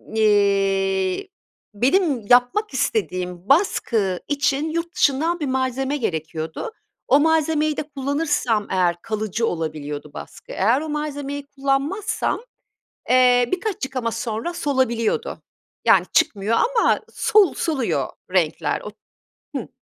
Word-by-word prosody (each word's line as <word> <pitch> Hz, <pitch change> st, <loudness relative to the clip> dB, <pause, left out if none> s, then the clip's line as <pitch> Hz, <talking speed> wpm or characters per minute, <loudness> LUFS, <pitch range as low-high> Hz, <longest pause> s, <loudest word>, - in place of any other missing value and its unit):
iii, 195 Hz, -, +2 dB, 0.4 s
benim 275 Hz, -, +2 dB
yapmak 250 Hz, -, +3 dB
istediğim 180 Hz, -, -2 dB
baskı 225 Hz, -, +2 dB
için 285 Hz, +1 st, 0 dB
yurt 335 Hz, +1 st, -3 dB
dışından 315 Hz, +5 st, +2 dB
bir 300 Hz, -, -2 dB
malzeme 265 Hz, +2 st, -1 dB
gerekiyordu. 160 Hz, -, -4 dB, 0.4 s
O 280 Hz, -, +5 dB
malzemeyi 310 Hz, -1 st, +2 dB
de -, -, -1 dB
kullanırsam 280 Hz, -6 st, -1 dB
eğer 180 Hz, -2 st, +2 dB
kalıcı 215 Hz, +1 st, -2 dB
olabiliyordu 150 Hz, -3 st, -4 dB
baskı. -, -, -10 dB
Eğer 230 Hz, +9 st, +2 dB
o 315 Hz, -, -5 dB
malzemeyi 285 Hz, -1 st, -4 dB
kullanmazsam, 285 Hz, +13 st, -1 dB, 0.7 s
eee, 250 Hz, -1 st, +5 dB
birkaç 380 Hz, -5 st, -2 dB
yıkama 255 Hz, -3 st, -3 dB
sonra 230 Hz, +11 st, -3 dB
solabiliyordu. 260 Hz, -8 st, -1 dB, 0.4 s
Yani -, -, +5 dB
çıkmıyor 210 Hz, +2 st, +2 dB, 0.2 s
ama 455 Hz, -, +3 dB
sol 405 Hz, -7 st, +4 dB
soluyor 295 Hz, -8 st, -1 dB, 0.3 s
renkler -, -, +1 dB
o -, -, -8 dB, 0.7 s
hıı. 245 Hz, -, -4 dB
260 Hz, 110 wpm, -22 LUFS, 205-305 Hz, 0.7 s, O